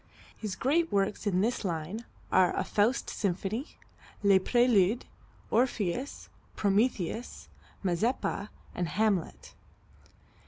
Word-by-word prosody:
His 210 -4 -4
great 325 - +1
works 200 +2 0
in 185 -2 +2
this 230 +3 0
line 180 +5 -3 0.3
are 185 -1 +4
a - - +1
"Faust 215 +5 +1
Symphony," 205 - -2 0.5
"Les 200 -1 +6
Préludes," 235 0 +3 0.5
"Orpheus," 240 0 0 0.3
"Prometheus," 210 +1 0 0.3
"Mazeppa" 205 +2 0 0.2
and 175 - -2
"Hamlet." 205 -1 -1
205 Hz, 95 wpm, -30 LUFS, 185-240 Hz, 0.5 s, Les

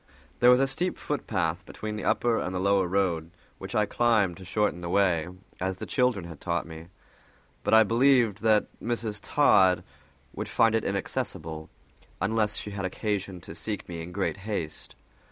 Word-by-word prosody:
There 120 - +6
was 125 0 +7
a 135 - +4
steep 175 +7 -2
footpath 90 - -2
between 105 +3 -6
the 105 - -5
upper 120 -2 +2
and 90 0 -3
the - - -1
lower 100 -1 +2
road, 85 -4 0 0.3
which - - -6
I 105 - +3
climbed 105 -5 +2
to 95 - -11
shorten 105 -1 0
the 85 -1 -5
way, 90 -4 +2 0.3
as 95 0 -2
the - - -6
children 125 -8 +1
had 85 -4 -10
taught 85 -1 -1
me, 80 0 -10 0.8
but - - +4
I 110 - +8
believed 120 -1 +3
that 110 -1 +4 0.2
Mrs. 115 -3 -2
Todd 95 - +4 0.5
would - - -5
find 115 -1 +3
it 115 - +1
inaccessible, 80 -5 -3 0.5
unless 105 +1 0
she 105 - -6
had 100 -1 -5
occasion 100 -1 -3
to 80 - -10
seek 105 +3 -5
me 85 -2 -6
in 85 +2 -7
great 95 +1 -1
haste. 100 -6 -5
100 Hz, 175 wpm, -27 LUFS, 90-110 Hz, 0.8 s, I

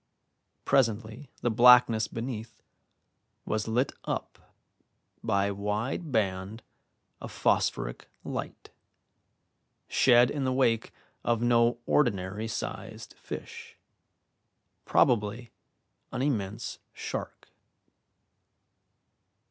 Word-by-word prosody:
Presently 115 +2 +1
the 120 - +1
blackness 120 -1 +6
beneath 115 -1 -6 0.9
was 110 0 -2
lit 120 +4 +1
up - - -5 0.7
by 100 0 +1
a 100 - -1
wide 105 - -3
band 100 -1 -1 0.6
of - - -8
phosphoric - - 0
light, - - -6 1.2
shed 120 0 +5
in 145 -2 -2
the 130 - +1
wake 115 -4 +1 0.3
of 120 -1 +1
no 120 0 +3
ordinary 105 -5 +1
sized 110 - -6
fish, - - -9 1.1
probably 115 0 +2 0.6
an 125 - -2
immense 110 -5 -2
shark. - - -6
115 Hz, 85 wpm, -28 LUFS, 105-125 Hz, 1.2 s, blackness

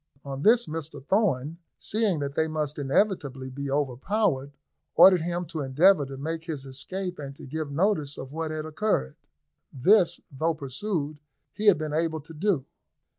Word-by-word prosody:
On 135 0 -5
this, 235 +7 +5
Mr 155 -2 -5
Thorn, 160 - 0 0.2
seeing 210 -8 0
that 140 -1 -3
they 160 +2 +1
must 155 -2 -3
inevitably 140 -4 0
be 140 +1 -5
overpowered, 140 - 0 0.4
ordered 185 -3 +8
him 175 +1 -2
to 160 -1 -5
endeavour 145 +4 +4
to 135 0 -8
make 160 +3 -4
his 150 -5 -5
escape, 180 +8 -5
and 140 -1 -7
to - - -11
give 150 +1 -4
notice 155 -3 0
of 130 - -7
what 160 0 -3
had 155 0 -4
occurred. 155 - -1 0.6
This, 180 - +4
though 160 +4 0
pursued, 150 - -3 0.3
he 215 0 -2
had 200 - +7
been 155 -1 -4
able 160 0 0
to 160 +3 -12
do. 165 -4 0
155 Hz, 165 wpm, -27 LUFS, 140-180 Hz, 0.6 s, ordered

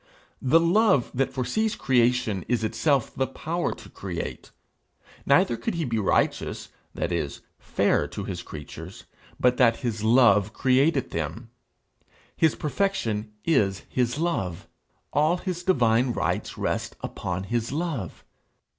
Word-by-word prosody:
The 140 +6 +5
love 170 - +3
that 135 +1 0
foresees 210 - -1
creation 120 -6 +2
is 120 -2 0
itself 135 +3 +1
the 130 - 0
power 170 +2 -2
to - - -13
create. - - -6 0.8
Neither - - +4
could 225 - -3
he 165 -2 -1
be 115 -3 -1
righteous 100 - 0 0.3
that 85 - -2
is, 80 -5 -2 0.2
fair - - +1
to - - -6
his - - -5
creatures 85 +4 -9 0.4
but 125 0 +3
that 115 -2 +4
his 110 -3 -2
love 110 -3 +5
created 135 +2 +2
them. 85 +9 -4 0.8
His 160 -2 +3
perfection 135 - -1
is 100 - +2
his 125 +1 0
love. 125 - -2 0.5
All 155 +5 +3
his 180 -1 -4
divine 125 -8 +2
rights - - -2
rest - - -2
upon 90 +1 -4
his 115 +4 -2
love. 145 - -3
125 Hz, 130 wpm, -26 LUFS, 110-160 Hz, 0.8 s, The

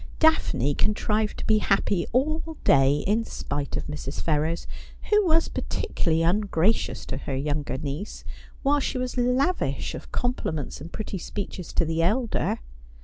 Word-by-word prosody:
Daphne 315 - +3
contrived 210 +4 +1
to - - -5
be 215 -1 +4
happy 195 -3 +1
all 310 +5 0
day, 140 +1 +4
in 215 +4 +2
spite 145 -9 -3
of - - -3
Mrs. 150 -2 -5
Ferrers, 160 +2 0 0.5
who 420 0 +6
was 325 0 +4
particularly 165 -1 -1
ungracious 195 +2 +1
to - - -4
her 135 0 -4
younger 145 0 -1
niece, 150 +7 -5 0.4
while 290 +1 +4
she 265 - -1
was 255 -1 -2
lavish 255 +8 +1
of - - -8
compliments 160 - -2
and 165 +4 -8
pretty 205 -3 -4
speeches 185 -1 -5
to 170 - +2
the 165 +1 0
elder. 220 - +1
195 Hz, 145 wpm, -26 LUFS, 150-250 Hz, 0.5 s, who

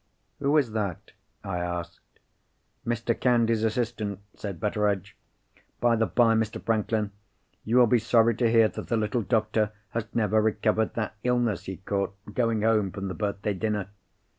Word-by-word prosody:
"Who 145 +2 +2
is 135 -7 +2
that?" 105 -5 -3 0.3
I 95 -2 -3
asked. 85 -1 -6 0.7
"Mr. 120 0 0
Candy's 115 -2 +2
assistant," 110 -3 -1 0.2
said 100 -5 -6
Betteredge. 105 -1 -1 0.6
"By 120 0 +3
the 110 -1 +1
bye, 115 -2 +4
Mr. 110 -1 0
Franklin, 110 -1 0 0.5
you 115 +3 +2
will 125 - +8
be 120 +1 +3
sorry 115 0 +4
to 120 -2 +3
hear 115 -1 +5
that - - -7
the 115 - +1
little 110 +2 0
doctor 110 -1 +1 0.2
has 115 -1 -3
never 110 -1 +3
recovered 110 0 +1
that 110 -2 -2
illness 120 -5 +1
he 95 -1 -5
caught, 100 +1 -2 0.2
going 115 -2 +1
home 110 -3 +3
from 100 0 -5
the - - -3
birthday 105 0 -2
dinner. 105 -1 -2
110 Hz, 160 wpm, -27 LUFS, 105-115 Hz, 0.7 s, will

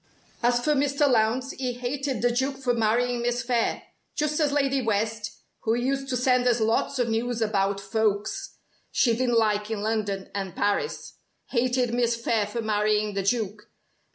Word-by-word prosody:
"As 240 0 +2
for 300 - +3
Mr. 285 +1 +2
Lowndes, 250 +2 +2
he 255 -1 -3
hated 255 0 -3
the 245 - +4
Duke 265 +3 -1
for 255 -2 0
marrying 235 +2 +1
Miss 240 +1 0
Phayre 240 -2 0 0.3
just 300 +1 0
as 295 -2 +2
Lady 275 -2 +1
West 220 -1 -1 0.2
(who 225 0 0
used 270 +3 -1
to 250 - 0
send 250 0 +2
us 240 -1 +3
lots 225 +5 +1
of 245 -2 +1
news 230 +1 -1
about 200 -3 +1
folks 215 - -1 0.3
she 235 -3 +2
didn't 240 -1 +1
like 210 -1 +1
in 215 -2 -3
London 210 -3 -2
and 195 -3 -4
Paris) 205 - -1 0.3
hated 250 -1 +1
Miss 240 -1 +2
Phayre 230 -2 0
for 230 +2 -4
marrying 210 0 +1
the 195 - -1
Duke. 210 0 -1
235 Hz, 170 wpm, -26 LUFS, 215-255 Hz, 0.3 s, the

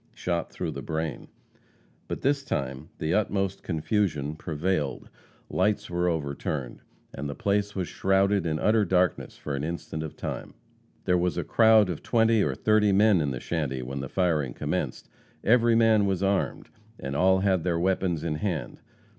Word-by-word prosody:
shot 85 -1 -2
through - - -4
the - - -6
brain. 80 0 -4 0.8
By - - -2
this 140 0 0
time 70 - -3
the 80 +2 -1
utmost 100 -2 0
confusion 80 -4 -1
prevailed. 80 -3 -2 0.4
Lights 100 0 0
were 90 0 +1
overturned, 70 -4 -3 0.3
and 70 +1 -5
the 70 - -5
place 100 0 0
was 95 -3 -2
shrouded 95 -1 +2
in 80 -1 0
utter 105 +6 +3
darkness 90 -2 0
in - - -3
an 70 - -3
instant 80 -1 -4
of 80 - -7
time. - - -5 0.5
There 90 0 +3
was 90 -2 0
a - - 0
crowd 110 -2 +5
of 80 - -6
twenty 115 -1 +3
or - - 0
thirty 105 -1 +3
men 100 -2 +4
in 75 - 0
the 65 -2 -4
shanty 70 -4 -2
when 70 +2 -5
the 70 -1 -5
firing 80 -9 0
commenced. - - -3 0.4
Every 115 0 +4
man 110 -3 +4
was 95 -1 0
armed, 100 0 0 0.3
and 70 +1 -4
all 95 +4 +4
had 95 -4 +2
their 85 -2 0
weapons 90 -2 0
in 75 -2 -1
hand. 85 -3 -3
90 Hz, 170 wpm, -27 LUFS, 75-100 Hz, 0.8 s, crowd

